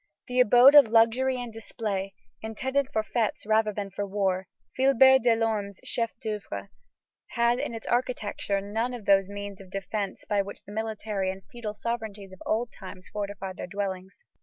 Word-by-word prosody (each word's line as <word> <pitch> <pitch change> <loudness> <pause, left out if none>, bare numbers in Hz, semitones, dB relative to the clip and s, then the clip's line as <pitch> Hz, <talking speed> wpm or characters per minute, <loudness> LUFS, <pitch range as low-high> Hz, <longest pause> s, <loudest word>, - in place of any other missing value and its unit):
The 250 0 -1
abode 250 +3 +8
of 290 -5 +9
luxury 235 +3 +3
and 240 -2 -6
display, 200 -3 -4 0.3
intended 265 +5 -1
for 220 -5 0
fêtes 220 -2 -1
rather 215 0 +3
than 200 -1 -5
for 205 - -3
war, 190 -2 -1 0.3
Philibert 265 0 +6
Delorme's 225 -4 +1
chef 230 -1 -2
d'oeuvre 200 - -5 0.6
has 235 +1 +2
in 270 -4 -3
its 225 - -8
architecture 225 -5 -1
none 225 +5 -2
of 225 -4 -9
those 195 -1 +4
means 200 -1 -7
of 190 - -13
defence 195 +1 -4
by 205 -1 +1
which 200 +1 -8
the - - -11
military 215 -2 -2
and 190 0 -6
feudal 220 -3 -6
sovereignties 215 -4 -4
of 190 - -14
old 230 +2 0
times 185 -1 -10
fortified 200 -2 -5
their - - -5
dwellings. 195 - -5
215 Hz, 165 wpm, -27 LUFS, 200-235 Hz, 0.6 s, of